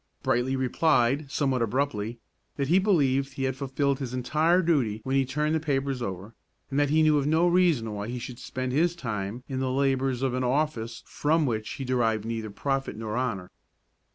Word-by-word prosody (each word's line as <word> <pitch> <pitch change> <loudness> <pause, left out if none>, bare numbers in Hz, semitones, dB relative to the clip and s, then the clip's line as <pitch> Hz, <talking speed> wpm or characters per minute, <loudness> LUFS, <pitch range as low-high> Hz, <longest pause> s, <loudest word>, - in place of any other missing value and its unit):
Brightly 125 +3 +1
replied, 135 +1 +2
somewhat 135 -2 0
abruptly, 115 -2 -1 0.4
that 140 -1 -2
he 180 +3 +5
believed 140 -9 +2
he 135 - -4
had 130 -1 0
fulfilled 140 0 -1
his 125 -2 -4
entire 155 +8 +2
duty 130 -11 +1
when 135 +1 -1
he 135 -1 +3
turned 150 +3 0
the 160 - +2
papers 135 -3 -1
over, 95 0 -5 0.4
and 135 - +1
that 145 -1 +2
he 155 +2 +4
knew 155 -1 +4
of 140 - -1
no 160 +3 +3
reason 170 -11 +2
why 105 0 -4
he 125 +1 -4
should 120 0 -7
spend 130 0 -4
his 165 +6 +2
time 110 - -4
in 130 -2 -3
the 130 0 0
labors 135 -1 +1
of 130 -2 +1
an 130 0 -1
office 125 -4 -1
from 155 +1 +1
which 110 -4 -2
he 135 - -5
derived 115 -4 +1
neither 115 -1 -3
profit 135 +4 -2
nor 110 -1 -4
honor. 115 -8 -2
130 Hz, 195 wpm, -27 LUFS, 120-145 Hz, 0.4 s, he